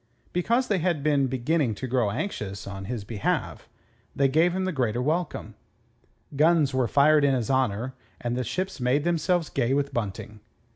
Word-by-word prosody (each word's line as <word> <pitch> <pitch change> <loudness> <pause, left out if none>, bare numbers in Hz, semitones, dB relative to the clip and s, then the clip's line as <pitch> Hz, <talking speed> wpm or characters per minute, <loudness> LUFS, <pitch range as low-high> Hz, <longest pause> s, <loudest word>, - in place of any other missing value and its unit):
Because 235 +8 +1
they 200 -3 +1
had 165 -4 0
been 145 -3 +2
beginning 130 -1 0
to 130 - -5
grow 125 -4 +1
anxious 100 - -4
on 95 -1 -7
his 115 0 -4
behalf, 105 0 -3 0.5
they 140 - +3
gave 160 +6 +3
him 190 0 -1
the 185 - 0
greater 120 -7 -1
welcome. 155 +5 -2 0.8
Guns 155 -1 +3
were 130 -2 +1
fired 145 +4 +4
in 140 -2 +4
his 125 0 -1
honour 130 -1 0 0.3
and 120 0 -2
the 125 - -1
ships 185 - -3
made 130 +4 +1
themselves 175 0 +1
gay 130 0 0
with 140 0 -1
bunting. 105 -1 -4
135 Hz, 175 wpm, -26 LUFS, 120-160 Hz, 0.8 s, fired